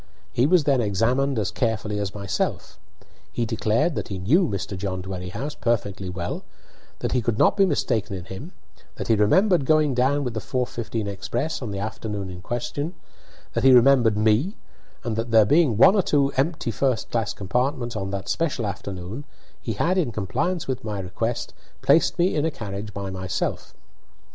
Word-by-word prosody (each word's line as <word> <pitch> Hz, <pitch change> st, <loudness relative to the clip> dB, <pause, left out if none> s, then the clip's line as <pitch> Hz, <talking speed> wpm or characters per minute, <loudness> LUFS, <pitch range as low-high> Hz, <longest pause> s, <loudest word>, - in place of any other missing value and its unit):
He 125 Hz, +4 st, +3 dB
was 175 Hz, -1 st, +4 dB
then 140 Hz, -3 st, +3 dB
examined 120 Hz, +6 st, +1 dB
as 105 Hz, -3 st, 0 dB
carefully 110 Hz, -3 st, -1 dB
as 100 Hz, -1 st, -3 dB
myself. 100 Hz, 0 st, -3 dB, 0.5 s
He 120 Hz, -, -1 dB
declared 110 Hz, +7 st, +1 dB
that -, -, -3 dB
he 100 Hz, -, -4 dB
knew 150 Hz, -, +3 dB
Mr. 100 Hz, -2 st, -3 dB
John 95 Hz, -1 st, -3 dB
Dwerrihouse 95 Hz, +9 st, -5 dB
perfectly 100 Hz, -5 st, -1 dB
well, 90 Hz, -1 st, -4 dB, 0.6 s
that -, -, -1 dB
he 125 Hz, -, +2 dB
could 115 Hz, -1 st, -1 dB
not -, -, +4 dB
be 195 Hz, -1 st, +4 dB
mistaken 105 Hz, -, 0 dB
in 90 Hz, -2 st, -7 dB
him, 125 Hz, -, -8 dB, 0.4 s
that -, -, -6 dB
he 115 Hz, -, +5 dB
remembered 175 Hz, -, +4 dB
going 155 Hz, 0 st, +3 dB
down 135 Hz, +4 st, +2 dB
with 125 Hz, -3 st, -3 dB
the 110 Hz, -, -2 dB
4:15 120 Hz, -3 st, -3 dB
express 120 Hz, +10 st, -3 dB
on 120 Hz, -, -4 dB
the 100 Hz, -, -4 dB
afternoon 105 Hz, -2 st, -4 dB
in 90 Hz, 0 st, -9 dB
question, 135 Hz, -, -3 dB, 0.6 s
that 115 Hz, -, -1 dB
he 135 Hz, -1 st, +7 dB
remembered 120 Hz, -3 st, +5 dB
me, 110 Hz, -, +2 dB, 0.5 s
and 115 Hz, -4 st, -2 dB
that, 115 Hz, +1 st, -2 dB
there 110 Hz, -2 st, +6 dB
being 145 Hz, -2 st, +3 dB
one 185 Hz, -, +8 dB
or 205 Hz, -, +4 dB
two 140 Hz, -5 st, +2 dB
empty 145 Hz, -2 st, 0 dB
first 125 Hz, -1 st, 0 dB
class 115 Hz, -3 st, 0 dB
compartments 125 Hz, +5 st, -1 dB
on 95 Hz, -2 st, -3 dB
that 100 Hz, 0 st, -4 dB
especial 145 Hz, -8 st, -1 dB
afternoon, 100 Hz, +4 st, -5 dB, 0.4 s
he 115 Hz, -, -3 dB
had, 180 Hz, -, +1 dB
in 150 Hz, -9 st, 0 dB
compliance 115 Hz, -, -2 dB
with 130 Hz, -2 st, -3 dB
my 105 Hz, -2 st, -3 dB
request, 105 Hz, +6 st, -3 dB, 0.3 s
placed 165 Hz, +5 st, +4 dB
me 175 Hz, +1 st, +2 dB
in 150 Hz, -, +1 dB
a 160 Hz, -, +2 dB
carriage 105 Hz, -6 st, -6 dB
by 100 Hz, -1 st, -5 dB
myself. 95 Hz, -1 st, -3 dB
115 Hz, 180 wpm, -24 LUFS, 100-140 Hz, 0.6 s, one